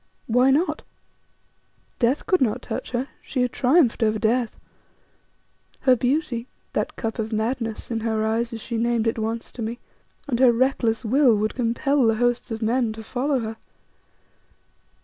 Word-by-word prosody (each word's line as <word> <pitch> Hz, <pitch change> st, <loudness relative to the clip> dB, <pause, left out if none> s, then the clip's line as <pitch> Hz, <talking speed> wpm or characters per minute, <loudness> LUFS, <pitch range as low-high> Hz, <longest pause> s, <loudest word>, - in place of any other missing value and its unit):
Why 250 Hz, +3 st, +3 dB
not? 300 Hz, +7 st, +1 dB, 1.2 s
Death 250 Hz, +4 st, +1 dB
could 370 Hz, -7 st, +2 dB
not 245 Hz, 0 st, +1 dB
touch -, -, -5 dB
her; 250 Hz, +2 st, -2 dB
she 255 Hz, -3 st, -1 dB
had 250 Hz, -, 0 dB
triumphed 260 Hz, -2 st, +3 dB
over 220 Hz, -1 st, +2 dB
death. 225 Hz, +2 st, 0 dB, 1.2 s
Her 260 Hz, -1 st, +5 dB
beauty 250 Hz, -1 st, -1 dB, 0.3 s
that -, -, -2 dB
"cup 225 Hz, +1 st, -4 dB
of 220 Hz, 0 st, -2 dB
madness" 225 Hz, +1 st, -2 dB
in 230 Hz, -, 0 dB
her 220 Hz, -1 st, -1 dB
eyes, 230 Hz, +2 st, 0 dB
as 225 Hz, -1 st, -6 dB
she 230 Hz, +1 st, -4 dB
named 235 Hz, 0 st, +1 dB
it 225 Hz, 0 st, 0 dB
once 225 Hz, +1 st, -3 dB
to 245 Hz, -, -8 dB
me 225 Hz, +2 st, -3 dB, 0.5 s
and 245 Hz, -4 st, -1 dB
her 255 Hz, -2 st, +7 dB
reckless 235 Hz, -2 st, +1 dB
will 250 Hz, -1 st, +4 dB
would 215 Hz, +1 st, -1 dB
compel 250 Hz, +2 st, +1 dB
the 225 Hz, -, +3 dB
hosts 245 Hz, +2 st, 0 dB
of 225 Hz, 0 st, -4 dB
men 230 Hz, 0 st, +1 dB
to 220 Hz, 0 st, -9 dB
follow 260 Hz, +4 st, -1 dB
her. 220 Hz, 0 st, -5 dB
235 Hz, 165 wpm, -24 LUFS, 225-255 Hz, 1.2 s, her